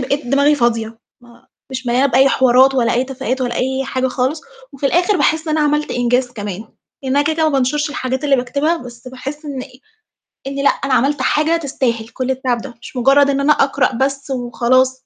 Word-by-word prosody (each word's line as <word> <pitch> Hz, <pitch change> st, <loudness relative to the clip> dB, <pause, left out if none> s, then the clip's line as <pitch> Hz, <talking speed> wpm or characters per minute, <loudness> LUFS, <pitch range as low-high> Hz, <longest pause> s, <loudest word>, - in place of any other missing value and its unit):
بقيت 280 Hz, +2 st, -2 dB
دماغي 280 Hz, +3 st, +3 dB
فاضية، 230 Hz, -3 st, -1 dB, 0.2 s
ما 240 Hz, -1 st, -20 dB, 0.2 s
مش 260 Hz, 0 st, -6 dB
مليانة 250 Hz, +3 st, +3 dB
بأي 265 Hz, +1 st, +4 dB
حوارات 260 Hz, +1 st, +4 dB
ولا 235 Hz, -3 st, +2 dB
أي 250 Hz, +2 st, +1 dB
تفاهات 265 Hz, -1 st, -4 dB
ولا 245 Hz, -2 st, -2 dB
أي 265 Hz, +2 st, -1 dB
حاجة 260 Hz, 0 st, -1 dB
خالص، 260 Hz, +5 st, -1 dB, 0.3 s
وفي 275 Hz, 0 st, -2 dB
الآخِر 355 Hz, +7 st, +2 dB
باحس 320 Hz, -1 st, +1 dB
إن 310 Hz, -, 0 dB
أنا 300 Hz, -, +2 dB
عملت 300 Hz, +1 st, 0 dB
إنجاز 245 Hz, +1 st, 0 dB
كمان، 205 Hz, -2 st, -6 dB, 0.4 s
لإن 265 Hz, +1 st, -1 dB
أنا 285 Hz, -, +4 dB
كده، 315 Hz, +2 st, 0 dB
كده 320 Hz, -, +1 dB
ما 310 Hz, -, +1 dB
بانشُرش 285 Hz, +3 st, 0 dB
الحاجات 260 Hz, -1 st, -3 dB
اللي 280 Hz, -2 st, +3 dB
باكتبها، 280 Hz, +6 st, 0 dB
بس 245 Hz, -3 st, -11 dB
باحس 275 Hz, +4 st, -8 dB
إن 275 Hz, -3 st, -5 dB, 0.8 s
إن 275 Hz, 0 st, -3 dB
لأ، -, -, +6 dB
أنا 275 Hz, -1 st, -1 dB
عملت 275 Hz, +4 st, +1 dB
حاجة 315 Hz, +2 st, +2 dB
تستاهل 250 Hz, -7 st, -2 dB
كل 255 Hz, +2 st, -4 dB
التعب 255 Hz, -2 st, -1 dB
ده، 250 Hz, -3 st, -9 dB
مش 245 Hz, -, -11 dB
مُجرّد 275 Hz, +3 st, +4 dB
إن 280 Hz, 0 st, 0 dB
أنا 295 Hz, +2 st, +4 dB
أقرأ 270 Hz, -2 st, +1 dB
بس 275 Hz, +3 st, -2 dB
وخلاص. 255 Hz, +1 st, +1 dB
265 Hz, 205 wpm, -17 LUFS, 250-285 Hz, 0.8 s, لأ